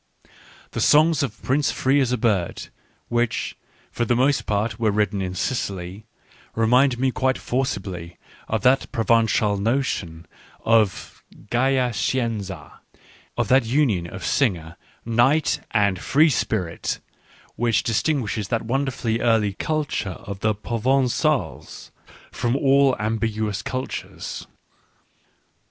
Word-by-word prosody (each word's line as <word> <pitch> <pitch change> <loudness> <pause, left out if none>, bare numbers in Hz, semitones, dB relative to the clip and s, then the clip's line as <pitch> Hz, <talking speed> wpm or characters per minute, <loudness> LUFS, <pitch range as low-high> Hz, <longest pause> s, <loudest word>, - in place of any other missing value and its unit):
The - - -3
songs 155 +1 +5
of 115 -6 -4
Prince 140 +2 +1
Free 135 +2 +2
as 130 -2 +1
a 125 - +1
Bird, 105 -7 -1 0.4
which, 120 -1 -1 0.4
for - - -1
the 120 +1 +1
most 135 +3 +2
part, 105 +1 -1
were 110 -2 +2
written 105 -1 0
in 90 -1 -3
Sicily, 100 -2 -3 0.5
remind 125 +3 +3
me 130 +1 +1
quite 130 +1 0
for 130 +2 -1
cibly 90 -6 -6 0.3
of 110 +1 -2
that 130 +1 +3
Provencal 115 -3 +2
notion 100 -7 -2 0.4
of 110 -4 +1
" - - -20
Gaya 130 0 +2
Scienza" 100 - -3 0.6
of - - 0
that 130 -1 +4
union 115 - +1
of 95 -1 -7
singer, 85 - 0 0.3
knight, 120 +7 +2
and 100 -4 +1
free 155 - +3
spirit, 90 -9 -2 0.6
which 115 -2 +1
distinguishes 115 -4 -1
that 115 +1 -1
wonderfully 125 -2 -1
early 110 -4 +2
culture 145 - -2
of 100 0 -6
the 110 0 +1
Provencals 130 +6 -1 0.4
from 120 +1 -1
all 135 -1 +4
ambiguous 110 -1 -2
cultures. 130 -1 -5
115 Hz, 120 wpm, -23 LUFS, 100-130 Hz, 0.6 s, songs